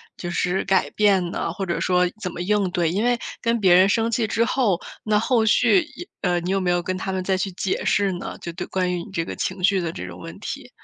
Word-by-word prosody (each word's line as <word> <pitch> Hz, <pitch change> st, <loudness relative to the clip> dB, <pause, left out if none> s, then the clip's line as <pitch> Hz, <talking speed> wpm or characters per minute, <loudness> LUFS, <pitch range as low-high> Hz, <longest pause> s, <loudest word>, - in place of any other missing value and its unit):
就 175 Hz, -1 st, -5 dB
是 180 Hz, +2 st, 0 dB
改 190 Hz, -1 st, +2 dB
变 195 Hz, -4 st, +3 dB
呢， -, -, -2 dB
或 195 Hz, +2 st, -4 dB
者 170 Hz, -, -2 dB
说 180 Hz, 0 st, +3 dB
怎 180 Hz, -, -3 dB
么 170 Hz, -, -8 dB
应 200 Hz, 0 st, +1 dB
对？ 175 Hz, -3 st, +1 dB
因 200 Hz, +6 st, 0 dB
为 245 Hz, 0 st, +2 dB, 0.2 s
跟 230 Hz, -1 st, +1 dB
别 185 Hz, -3 st, +5 dB
人 185 Hz, +2 st, +6 dB
生 225 Hz, +2 st, +2 dB
气 230 Hz, -1 st, 0 dB
之 230 Hz, +1 st, +1 dB
后， 220 Hz, -11 st, +1 dB, 0.2 s
那 210 Hz, -1 st, +2 dB
后 230 Hz, 0 st, +2 dB
续 240 Hz, -, +4 dB
一 310 Hz, +4 st, -10 dB
呃， 175 Hz, -1 st, +1 dB
你 180 Hz, +2 st, -3 dB
有 195 Hz, -1 st, +1 dB
没 180 Hz, -1 st, +1 dB
有 175 Hz, 0 st, +1 dB
跟 185 Hz, +2 st, -3 dB
他 190 Hz, +1 st, -3 dB
们 190 Hz, 0 st, -2 dB
再 190 Hz, +1 st, 0 dB
去 190 Hz, +1 st, -2 dB
解 185 Hz, +1 st, -2 dB
释 200 Hz, -2 st, +2 dB
呢， 175 Hz, -, -6 dB
就 170 Hz, -, -6 dB
对 170 Hz, -, -5 dB
关 180 Hz, -1 st, -1 dB
于 175 Hz, -1 st, -3 dB
你 -, -, -12 dB
这 165 Hz, -3 st, -2 dB
个 -, -, -6 dB
情 185 Hz, 0 st, -3 dB
绪 190 Hz, 0 st, +3 dB
的 165 Hz, -, -2 dB
这 90 Hz, -, -7 dB
种 -, -, -9 dB
问 -, -, -9 dB
题？ -, -, -6 dB
190 Hz, 290 characters per minute, -23 LUFS, 180-210 Hz, 0.2 s, 人